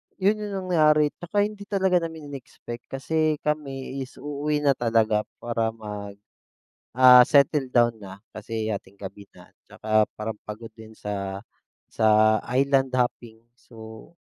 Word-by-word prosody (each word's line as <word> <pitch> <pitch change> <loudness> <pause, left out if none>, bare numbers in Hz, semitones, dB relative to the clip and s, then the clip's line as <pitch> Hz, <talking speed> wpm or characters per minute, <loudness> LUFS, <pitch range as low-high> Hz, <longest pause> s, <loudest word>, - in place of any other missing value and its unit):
'yon 205 +3 +1
yung 195 -3 -5
nangyari 150 -3 +4
'tsaka 205 +4 -1
hindi 205 -1 -6
talaga 190 -3 +2
namin 160 -3 -7
i-nexpect. 120 -3 -9
Kasi 155 +3 0
kami 140 -3 -3
is 130 +1 -7
uuwi 150 +1 -3
na 140 - +4
talaga 115 -4 +1 0.2
para 115 -1 -1
mag, 105 -2 -8 0.8
ah, 125 0 +8
settle 140 -1 +2
down 120 -2 +3
na 95 0 -10 0.2
kasi 110 0 -4
hating-gabi 100 -1 -7
na, - - -17 0.2
'tsaka 110 0 +1 0.2
parang 110 0 -4
pagod 110 +2 -8
din 110 -1 -13
sa, 100 -2 -5 0.5
sa 110 0 +4
island 135 0 +2
hopping. 120 -2 -2 0.2
So 110 +1 -13
125 Hz, 135 wpm, -25 LUFS, 110-150 Hz, 0.8 s, ah